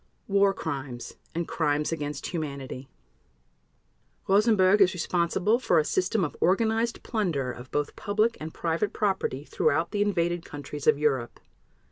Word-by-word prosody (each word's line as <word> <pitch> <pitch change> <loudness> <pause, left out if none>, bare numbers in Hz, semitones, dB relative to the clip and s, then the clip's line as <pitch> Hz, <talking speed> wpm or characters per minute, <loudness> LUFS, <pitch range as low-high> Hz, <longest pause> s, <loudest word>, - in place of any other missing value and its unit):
War 200 0 +4
Crimes 135 -9 -5 0.2
and 170 0 -2
Crimes 150 -1 0
against 145 -3 -4
Humanity 140 -5 -5 1.4
Rosenberg 205 -1 +4
is 185 0 +5
responsible 180 +6 +1
for 180 -9 +2
a 155 - +3
system 185 +4 +1
of 150 - -6
organized 225 +5 +1
plunder 170 - -1
of 125 +1 -10
both 145 0 -2
public 215 +3 +1
and 155 +1 -6
private 170 +7 -1
property 190 -9 -1
throughout 160 +3 +1
the 205 - -1
invaded 175 -4 0
countries 145 0 -7
of - - +6
Europe. 135 -5 0
170 Hz, 135 wpm, -27 LUFS, 145-200 Hz, 1.4 s, of